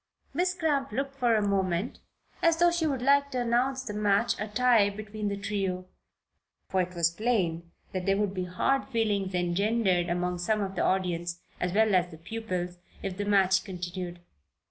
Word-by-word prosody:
Miss 360 +4 +1
Cramp 290 -7 0
looked 275 +4 -2
for 240 -3 +3
a 210 -1 +1
moment 190 0 0 0.4
as 330 -1 +4
though 345 +1 +5
she 340 -2 0
would 265 -4 -1
like 280 +1 +4
to 255 -3 -2
announce 250 +3 +1
the 225 -5 -5
match 210 +2 +2
a 215 - -2
tie 230 -1 +4
between 210 +1 -5
the 200 0 -2
trio, 195 -3 -2 0.8
for 190 - +1
it 180 0 -4
was 170 -1 +3
plain 170 -5 0 0.2
there 195 +1 +1
would 205 -2 0
be 185 -2 -2
hard 265 +10 0
feelings 205 -6 0
engendered 180 0 +1
among 180 0 -1
some 210 +4 +1
of 195 -1 -2
the 185 - -2
audience, 175 -2 0 0.2
as 180 - -1
well 220 0 +3
as 180 -1 +3
the 160 - -11
pupils, 180 -1 -4 0.2
if 195 -2 -3
the 205 - -2
match 190 -2 +3
continued. 180 -2 -6
200 Hz, 180 wpm, -28 LUFS, 180-235 Hz, 0.8 s, though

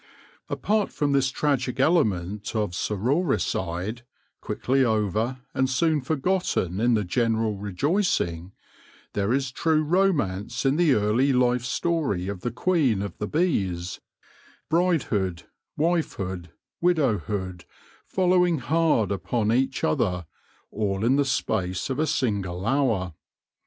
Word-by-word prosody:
Apart 210 -1 0
from 145 -1 0
this 135 -2 +3
tragic 130 -2 -1
element 105 - +1
of 105 -4 0
sororicide, 105 - -1 0.4
quickly 135 +1 0
over 110 +2 0
and 130 0 +1
soon 155 +3 +2
forgotten 135 - 0
in 120 +1 +3
the 105 - +1
general 110 +2 0
rejoicing, 100 - -1 0.6
there 100 +1 0
is 135 0 0
true 155 +3 +1
romance 150 - 0
in 135 +1 +3
the 160 -5 +4
early 110 +7 +2
life 125 -1 +2
story 130 - -1
of 100 -2 -5
the 120 - -1
Queen 125 - +1
of 100 - -6
the 105 - -2
Bees 95 - -1 0.3
— - - -29
bridehood, 125 - +1 0.4
wifehood, 100 - -1 0.3
widowhood, 105 - 0 0.4
follow, 185 -1 +3
ing 175 -2 +2
hard 150 -5 +1
upon 105 +2 0
each 130 +3 0
other, 90 +3 0 0.5
all 100 -1 -1
in 130 +3 +4
the 140 0 +2
space 95 -5 -1
of 130 - -2
a 155 - +2
single 100 -9 -1
hour. 115 - +1
120 Hz, 125 wpm, -25 LUFS, 100-150 Hz, 0.6 s, the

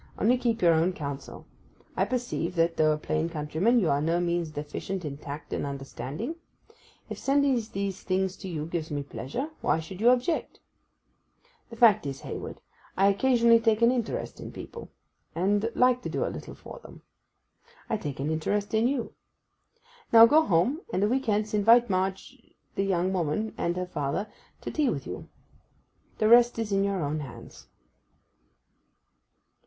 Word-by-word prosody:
Only 240 +4 +3
keep 230 -3 -1
your 170 -1 +6
own 165 +3 +2
counsel. 140 -4 -7 0.5
I - - +2
perceive 240 -8 -3
that, 165 0 +2
though 155 0 +3
a 150 - +1
plain 155 +2 -1
countryman, 165 +9 +1
you 180 -9 +2
are 140 +1 +1
by - - -1
no 170 +1 +2
means 170 -1 -1
deficient 155 +5 -5
in 140 -2 -4
tact 145 +1 -8
and - - -2
understanding. 140 - -5 0.7
If - - -7
sending 280 0 +2 0.2
these 195 -1 -3
things 190 0 -1
to 190 - -7
you 155 -3 -4
gives 165 -1 -4
me 145 -2 -3
pleasure, 240 - -5
why 160 - +1
should 180 +5 -8
you 235 - +6
object? 255 +7 0 1.1
The 230 - -10
fact 215 -8 +5
is, 135 -1 -6
Hayward, - - -7 0.4
I 195 +1 +5
occasionally 235 +2 +4
take 225 0 +2
an 235 - +6
interest 245 -3 -3
in - - -8
people, 465 - -9 0.5
and 205 +5 +1
like 250 0 +3
to - - -5
do - - -1
a - - -3
little - - -8
for - - -11
them. - - -14 0.8
I - - 0
take 145 -10 -6
an 145 +3 -1
interest 200 +7 -1
in 220 +2 +3
you. 255 -3 -2 1.0
Now 230 0 +10
go 300 +7 +5
home, 245 - +1
and 190 -2 0
a - - +4
week 260 +3 -1
hence 210 0 0
invite 225 +2 +5
Marg—the 190 +1 -4
young 190 -1 0
woman 185 +5 -1
and 175 +1 -2
her 180 - -2
father, 150 +5 -3 0.3
to - - -5
tea 300 -4 +1
with 140 - -3
you. 90 - -7 0.9
The 215 - +2
rest 240 +1 +6
is 225 -2 -3
in 195 0 +2
your 200 -4 -1
own 150 +2 -2
hands. 135 -5 -10
195 Hz, 170 wpm, -27 LUFS, 160-230 Hz, 1.1 s, Now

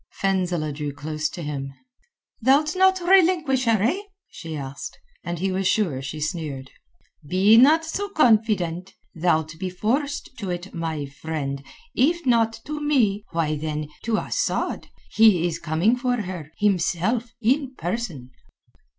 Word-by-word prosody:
Fenzileh 180 -6 0
drew 145 0 -4
close 150 +2 -3
to 175 - -7
him. 135 -2 -5 0.7
"Thou'lt 290 +6 +3
not 380 0 +4
relinquish 335 -8 +4
her, 220 -3 +3
eh?" 320 - +1 0.3
she 160 -2 -7
asked, 135 0 -7 0.3
and 175 0 -4
he 190 +3 -1
was 190 0 0
sure 170 -13 +1
she 140 +3 -6
sneered. 150 -4 -4 0.6
"Be 195 +5 +5
not 305 +7 +6
so 400 +5 -3
confident. 210 - +2 0.2
Thou'lt 160 -2 0
be 185 0 -2
forced 260 +9 -2
to 200 -4 -4
it, 175 +2 -5
my 160 -3 -3
friend—if 160 - -3
not 230 -3 +2
to 300 0 -5
me, 225 -9 +2
why 160 -2 0
then, 150 0 -4
to 225 -1 0
Asad. - - -2 0.2
He 215 -6 +5
is 170 -2 -2
coming 170 +8 +2
for 250 -2 -1
her, 180 -6 -6
himself, 210 +4 0
in 260 +3 +1
person." 170 - -4
190 Hz, 140 wpm, -24 LUFS, 155-245 Hz, 0.7 s, not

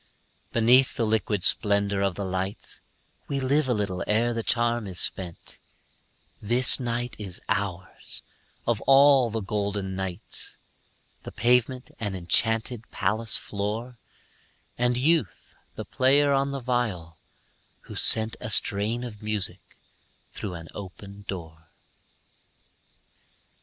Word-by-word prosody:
Beneath 125 +3 +3
the 115 - -1
liquid 105 -3 -1
splendor 100 -1 +6
of 95 -2 -1
the 100 - -5
lights 95 +1 -5 0.5
We 140 - -3
live 135 +1 0
a - - +2
little 100 -3 -3
ere 115 +3 0
the 115 - -3
charm 120 -1 0
is 90 -2 -4
spent; 90 -3 +1 0.8
This 120 +6 +7
night 120 -1 -4
is 95 -4 -4
ours, 95 -2 -4 0.4
of 115 -2 -1
all 135 -2 +5
the 110 0 -4
golden 100 -1 -4
nights, 95 0 -3 0.6
The - - -10
pavement 125 +3 0
an 105 -4 -4
enchanted 110 +6 0
palace 110 +4 0
floor, 110 +4 -5 0.8
And 125 0 0
Youth 145 - -1 0.2
the - - -7
player 140 +2 +2
on 140 0 0
the 140 0 -5
viol, 110 -11 -4 0.6
who - - -13
sent 110 0 +5
A - - -7
strain 105 +4 +2
of 105 -4 -9
music 100 -4 -1 0.5
through 95 -4 -7
an 80 -1 -10
open 100 +1 -11
door. 80 -3 -9
110 Hz, 120 wpm, -24 LUFS, 100-120 Hz, 0.8 s, This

